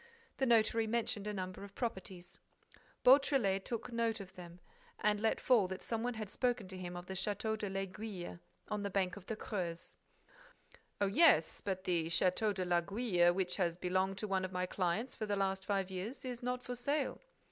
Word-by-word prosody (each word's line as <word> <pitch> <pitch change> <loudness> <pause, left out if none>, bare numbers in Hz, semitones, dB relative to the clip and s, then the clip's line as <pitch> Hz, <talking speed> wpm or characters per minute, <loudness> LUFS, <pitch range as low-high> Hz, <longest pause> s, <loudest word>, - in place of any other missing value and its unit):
The 265 - +1
notary 225 -1 +4
mentioned 220 -2 0
a 210 - -2
number 185 0 -5
of 200 0 -11
properties. 190 -6 -5 0.6
Beautrelet 255 -8 +5
took 235 0 -4
note 230 -1 0
of 190 -2 -9
them 175 -1 -11 0.4
and 210 -1 +2
let 220 +1 +1
fall 230 -7 +4
that 190 0 -6
some 225 -1 -2
one 245 0 -1
had 215 -1 -4
spoken 240 -1 0
to 190 - -6
him 175 -1 -5
of 175 - -7
the 190 - -5
Château 210 +3 -1
de 210 -2 -3
l'Aiguille, 195 - -5 0.3
on 210 -1 -2
the 200 - -2
bank 185 -1 0
of 200 -3 -12
the 220 - -2
Creuse. 175 -6 -4 1.0
"Oh, 200 - +3
yes, 200 - +5
but 190 -2 -2
the 170 -3 +1
Château 185 +5 +2
de 185 -2 -2
l'Aiguille, 175 +1 +3
which 180 0 0
has 175 -3 +1
belonged 185 +1 0
to 215 - -3
one 190 -1 +1
of 185 - -3
my 180 0 -1
clients 185 +7 -1
for 215 - -4
the 205 - +1
last 195 -1 0
five 195 -2 0
years, 200 +9 -5
is 250 -1 -4
not 250 0 -2
for 250 - -4
sale." 280 +4 -1
195 Hz, 195 wpm, -35 LUFS, 185-225 Hz, 1.0 s, Beautrelet